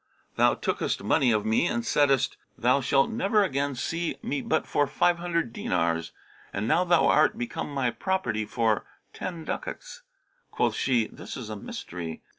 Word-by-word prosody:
Thou -, -, +4 dB
tookest -, -, -2 dB
money 130 Hz, -3 st, +3 dB
of 105 Hz, -2 st, +1 dB
me 110 Hz, +10 st, +2 dB
and 235 Hz, +5 st, -1 dB
saidest, 140 Hz, -, +2 dB, 0.2 s
'Thou 130 Hz, +4 st, +3 dB
shalt 135 Hz, -, +2 dB
never 225 Hz, -2 st, +2 dB
again 140 Hz, -4 st, -1 dB
see 165 Hz, +6 st, -2 dB
me 145 Hz, -1 st, -2 dB
but 160 Hz, -, 0 dB
for 145 Hz, -, +1 dB
five 175 Hz, +5 st, +2 dB
hundred 170 Hz, -7 st, -1 dB
dinars.' 85 Hz, 0 st, -1 dB, 0.4 s
And 105 Hz, +2 st, -2 dB
now 165 Hz, +8 st, +3 dB
thou 175 Hz, -2 st, +4 dB
art 215 Hz, -, +4 dB
become 230 Hz, -11 st, -4 dB
my 135 Hz, -4 st, 0 dB
property 120 Hz, -, -1 dB
for 110 Hz, 0 st, +1 dB, 0.3 s
ten 170 Hz, -3 st, -6 dB
ducats.' -, -, -6 dB, 0.5 s
Quoth -, -, +1 dB
she, 125 Hz, -4 st, +1 dB
'This -, -, -9 dB
is 120 Hz, -5 st, -7 dB
a -, -, -4 dB
mystery. 85 Hz, -4 st, -7 dB
140 Hz, 165 wpm, -27 LUFS, 115-170 Hz, 0.5 s, Thou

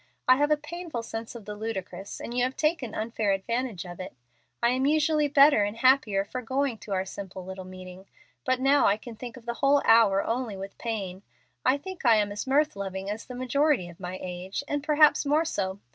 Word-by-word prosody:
I 255 Hz, 0 st, +7 dB
have 290 Hz, +1 st, +2 dB
a 300 Hz, -, +4 dB
painful 310 Hz, -4 st, -6 dB
sense 225 Hz, +1 st, -6 dB
of 225 Hz, -4 st, -9 dB
the 210 Hz, -, -5 dB
ludicrous, 205 Hz, -2 st, -6 dB
and 240 Hz, -, -6 dB
you 245 Hz, -, +2 dB
have 260 Hz, +1 st, -1 dB
taken 305 Hz, -7 st, 0 dB
unfair 215 Hz, -2 st, 0 dB
advantage 225 Hz, -1 st, -2 dB
of 175 Hz, 0 st, -9 dB
it. 185 Hz, -, -7 dB, 0.5 s
I 235 Hz, -, +5 dB
am 260 Hz, +2 st, +1 dB
usually 305 Hz, 0 st, +3 dB
better 280 Hz, -5 st, +6 dB
and 205 Hz, +2 st, -3 dB
happier 230 Hz, -6 st, +3 dB
for 255 Hz, +5 st, -5 dB
going 260 Hz, -1 st, -1 dB
to 210 Hz, -, -10 dB
our 190 Hz, 0 st, 0 dB
simple 190 Hz, -1 st, -8 dB
little 190 Hz, 0 st, -7 dB
meeting, 185 Hz, +1 st, -11 dB, 0.4 s
but 255 Hz, -1 st, +1 dB
now 275 Hz, +2 st, +4 dB
I 200 Hz, -, +3 dB
can 230 Hz, +1 st, -10 dB
think 240 Hz, +2 st, -8 dB
of 235 Hz, -, -14 dB
the 235 Hz, -, -2 dB
whole 280 Hz, 0 st, +4 dB
hour 210 Hz, -4 st, +5 dB
only 230 Hz, -3 st, -2 dB
with 195 Hz, +1 st, -8 dB
pain. 195 Hz, -5 st, -4 dB, 0.4 s
I 260 Hz, +2 st, +3 dB
think 375 Hz, +5 st, -8 dB
I 235 Hz, -3 st, +6 dB
am 205 Hz, -1 st, +1 dB
as 205 Hz, +5 st, -5 dB
mirth 295 Hz, +1 st, +2 dB
loving 195 Hz, 0 st, -4 dB
as 215 Hz, +2 st, -6 dB
the 250 Hz, -, -7 dB
majority 255 Hz, -, +1 dB
of 170 Hz, -, -14 dB
my 180 Hz, 0 st, -5 dB
age, 185 Hz, +6 st, -5 dB
and 290 Hz, 0 st, -2 dB
perhaps 300 Hz, 0 st, +5 dB
more 300 Hz, +3 st, +2 dB
so. 195 Hz, -10 st, -2 dB
230 Hz, 220 wpm, -27 LUFS, 195-275 Hz, 0.5 s, I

